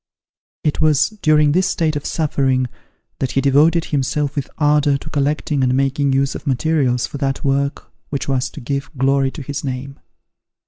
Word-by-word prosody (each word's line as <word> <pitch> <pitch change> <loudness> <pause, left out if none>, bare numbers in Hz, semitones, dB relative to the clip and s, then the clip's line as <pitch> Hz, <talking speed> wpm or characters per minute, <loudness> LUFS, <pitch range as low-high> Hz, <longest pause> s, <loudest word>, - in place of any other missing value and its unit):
It 150 - 0
was 150 -2 +3
during 150 -2 +4
this 185 +4 +2
state 160 -3 0
of 145 - -3
suffering, 135 -5 +1 0.5
that 130 - -2
he - - +2
devoted 150 +5 +3
himself 145 +1 -1
with 140 -3 -3
ardour 150 -2 +3
to 155 - -10
collecting 145 0 0
and 130 0 +2
making 135 +1 +1
use 135 +1 +1
of - - -8
materials 130 -3 +1
for 140 +4 -7
that 135 -1 -2
work 140 0 -1 0.2
which 140 - -3
was 130 -2 0
to - - -10
give 140 +3 -3
glory 135 +1 +2
to 145 +2 -8
his 140 +2 -5
name. 135 +1 -5
140 Hz, 175 wpm, -19 LUFS, 135-150 Hz, 0.5 s, during